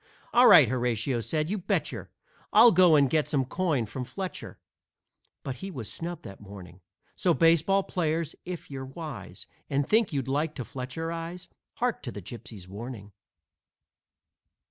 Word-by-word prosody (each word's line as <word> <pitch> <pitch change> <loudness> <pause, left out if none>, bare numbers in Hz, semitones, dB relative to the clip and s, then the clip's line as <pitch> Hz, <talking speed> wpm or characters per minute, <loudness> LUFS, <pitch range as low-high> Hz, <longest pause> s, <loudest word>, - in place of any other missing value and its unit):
"All 245 +1 +7
right!" 145 - +9
Horatio 120 0 0
said, 155 - -2
"you 210 - -1
betcher 175 - -2 0.4
I'll 225 +3 +8
go 180 -3 +6
and 140 -2 +5
get 155 +2 +1
some 135 -3 +1
coin 150 -4 0
from 125 +5 -5
Fletcher," 185 +8 -6 0.9
But 130 -2 -5
he 195 - -6
was 125 - -6
snubbed 175 +1 -6
that 100 -3 -10
morning. 95 -3 -12 0.3
So, 175 -3 +2
baseball 170 +4 +4
players, 165 -4 -2
if 180 -4 -7
you're 135 -1 -5
wise, 135 0 -8 0.2
And 140 0 0
think 220 -2 +3
you'd 135 -4 -2
like 150 +3 -1
to 130 - -4
Fletcherize, 165 +7 -5 0.2
Hark - - -1
to - - -5
the 100 - -7
Gypsy's 100 -1 -10
warning! 105 +1 -8
145 Hz, 150 wpm, -28 LUFS, 120-170 Hz, 0.9 s, right